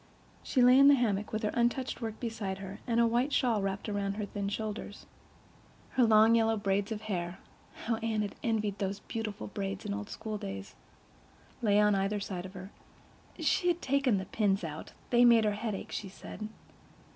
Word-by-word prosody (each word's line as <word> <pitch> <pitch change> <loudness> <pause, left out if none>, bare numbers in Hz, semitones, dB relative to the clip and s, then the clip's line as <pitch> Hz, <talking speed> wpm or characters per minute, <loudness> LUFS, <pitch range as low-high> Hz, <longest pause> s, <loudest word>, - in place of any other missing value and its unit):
She 255 - +2
lay 250 +2 +7
in 275 - +8
the 285 - +8
hammock, 210 -5 0
with 220 +1 -2
her 210 - +1
untouched 240 +2 0
work 220 -1 -4
beside 220 -5 -3
her, 195 0 -8
and 235 -1 +2
a 235 - +5
white 240 +5 +1
shawl 235 -7 +2
wrapped 195 +2 -3
about 200 -1 -1
her 210 -1 -3
thin 200 0 -3
shoulders. 210 0 -5 0.9
Her 255 - +3
long 220 0 +6
yellow 225 -1 +3
braids 200 0 0
of 215 -1 -3
hair—how 190 +3 -5
Anne 220 -2 -1
had 205 - -4
envied 215 -3 -1
those 195 0 -2
beautiful 225 -2 -5
braids 195 0 -4
in 205 - -2
old 205 +1 -5
schooldays!—lay 205 - -5
on 210 0 +4
either 195 +1 0
side 190 -2 -5
of 190 - -14
her. 190 +2 -8 0.7
She 355 - +1
had 350 0 +1
taken 270 -5 +2
the 190 - -3
pins 200 -3 +1
out—they 165 +9 -1
made 235 -2 +6
her 210 - +3
head 210 0 -3
ache, - - -8
she 195 - -4
said. 210 +2 -8
210 Hz, 180 wpm, -31 LUFS, 200-230 Hz, 0.9 s, in